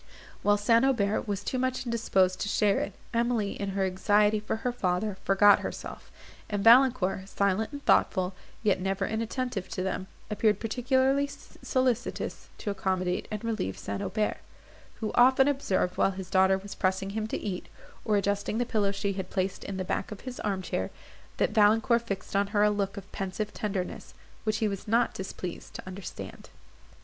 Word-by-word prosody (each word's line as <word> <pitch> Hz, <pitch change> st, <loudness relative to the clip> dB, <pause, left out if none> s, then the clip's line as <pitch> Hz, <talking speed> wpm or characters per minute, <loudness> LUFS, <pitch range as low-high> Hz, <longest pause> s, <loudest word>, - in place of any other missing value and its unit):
While 205 Hz, 0 st, +4 dB
St. 230 Hz, +3 st, +4 dB
Aubert 220 Hz, -7 st, +1 dB
was 205 Hz, -1 st, -2 dB
too 255 Hz, -, -2 dB
much 255 Hz, 0 st, -1 dB
indisposed 195 Hz, -6 st, +1 dB
to 205 Hz, -, -2 dB
share 205 Hz, -2 st, +3 dB
it, 195 Hz, -, -3 dB, 0.2 s
Emily, 230 Hz, -3 st, +1 dB
in 200 Hz, -1 st, -4 dB
her 195 Hz, -, +2 dB
anxiety 205 Hz, +3 st, +3 dB
for 210 Hz, -, -2 dB
her 250 Hz, -, +2 dB
father, 195 Hz, -2 st, -1 dB
forgot 200 Hz, +1 st, +6 dB
herself; -, -, -7 dB, 0.4 s
and 205 Hz, -1 st, -1 dB
Valancourt, 225 Hz, -6 st, +5 dB
silent 200 Hz, +4 st, 0 dB
and 285 Hz, -1 st, -8 dB
thoughtful, 185 Hz, -1 st, +3 dB, 0.3 s
yet 195 Hz, -4 st, +2 dB
never 195 Hz, +1 st, 0 dB
inattentive 225 Hz, -2 st, -3 dB
to 185 Hz, -, -3 dB
them, 190 Hz, 0 st, -3 dB, 0.2 s
appeared 210 Hz, -1 st, +2 dB
particularly 260 Hz, +4 st, +2 dB
solicitous 255 Hz, -3 st, -2 dB
to 205 Hz, -, -3 dB
accommodate 185 Hz, -2 st, -1 dB
and 215 Hz, 0 st, -5 dB
relieve 220 Hz, -, -2 dB
St. 100 Hz, 0 st, -4 dB
Aubert, 215 Hz, -1 st, -1 dB, 0.6 s
who 215 Hz, -, -1 dB
often 260 Hz, +2 st, +6 dB
observed, 200 Hz, -10 st, 0 dB
while -, -, +4 dB
his 190 Hz, -1 st, -7 dB
daughter 190 Hz, 0 st, +4 dB
was 200 Hz, +1 st, -8 dB
pressing 190 Hz, +1 st, 0 dB
him 215 Hz, +1 st, -2 dB
to -, -, -2 dB
eat, 190 Hz, -4 st, -4 dB, 0.4 s
or 210 Hz, -1 st, +2 dB
adjusting 200 Hz, +2 st, 0 dB
the 245 Hz, -, +1 dB
pillow 210 Hz, -4 st, +1 dB
she 200 Hz, 0 st, -2 dB
had 190 Hz, -1 st, -5 dB
placed 190 Hz, 0 st, -2 dB
in 195 Hz, -, -5 dB
the 185 Hz, -, -2 dB
back -, -, -2 dB
of 210 Hz, -, -7 dB
his 255 Hz, -1 st, -7 dB
arm 195 Hz, -3 st, -2 dB
chair, 95 Hz, -, -2 dB, 0.5 s
that -, -, +2 dB
Valancourt 225 Hz, +2 st, +4 dB
fixed 195 Hz, -4 st, -5 dB
on 200 Hz, 0 st, +3 dB
her 205 Hz, 0 st, +2 dB
a 210 Hz, -, +5 dB
look 200 Hz, 0 st, -2 dB
of 195 Hz, -1 st, -9 dB
pensive 195 Hz, +2 st, -4 dB
tenderness, 195 Hz, -4 st, -4 dB, 0.3 s
which 215 Hz, -1 st, +1 dB
he 220 Hz, -, +1 dB
was 200 Hz, 0 st, -5 dB
not 230 Hz, +3 st, +2 dB
displeased 185 Hz, -2 st, -6 dB
to -, -, -7 dB
understand. 185 Hz, 0 st, -8 dB
205 Hz, 180 wpm, -28 LUFS, 190-230 Hz, 0.6 s, forgot